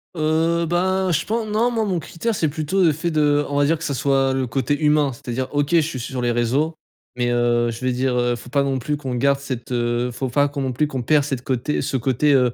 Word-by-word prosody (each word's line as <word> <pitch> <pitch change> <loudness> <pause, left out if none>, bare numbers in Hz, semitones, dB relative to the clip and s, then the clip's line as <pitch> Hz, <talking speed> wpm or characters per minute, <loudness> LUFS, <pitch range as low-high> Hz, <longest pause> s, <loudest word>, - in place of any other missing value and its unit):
Heu, 165 +2 +1
ben, 185 +2 +1
je 165 +1 0
pen 225 +1 -1
non. 230 +3 +2
Moi, 225 -2 0
mon 185 -4 -1
critère, 220 +9 -3
c'est 160 -5 0
plutôt 160 +6 0
le 165 - +5
fait 170 +3 -2
de 145 -1 +2
on 145 0 -2
va 145 - +4
dire 165 +2 +2
que 165 - -9
ça 140 - -1
soit 135 0 +1
le 130 -1 -1
côté 135 +5 -1
humain. 150 -3 +3
C'est-à-dire 125 +2 -4
OK, 145 0 0
je 170 -1 +5
suis 145 -4 -4
sur 125 +1 -4
les 120 0 +1
réseaux. 130 +7 0 0.4
Mais, 120 -1 0
heu, 120 0 +2
je 115 +3 -8
vais 130 - +2
dire, 125 0 0
heu, 120 0 +1
faut 120 +1 -11
pas 140 +1 +2
non 135 -1 -1
plus 150 +5 -2
qu'on 130 -3 -5
garde 140 +2 +2
cette, 130 -3 -6
heu 120 0 0
faut 130 +2 -3
pas 145 +3 +2
qu'on 140 -1 -5
non 130 -1 -1
plus 150 +5 0
qu'on 130 -4 -4
perd 145 +3 +3
cette 130 -4 -3
côté 130 +3 -1
ce 135 0 -1
côté, 135 +4 +2
heu, 125 -3 +3
140 Hz, 265 wpm, -21 LUFS, 125-155 Hz, 0.4 s, le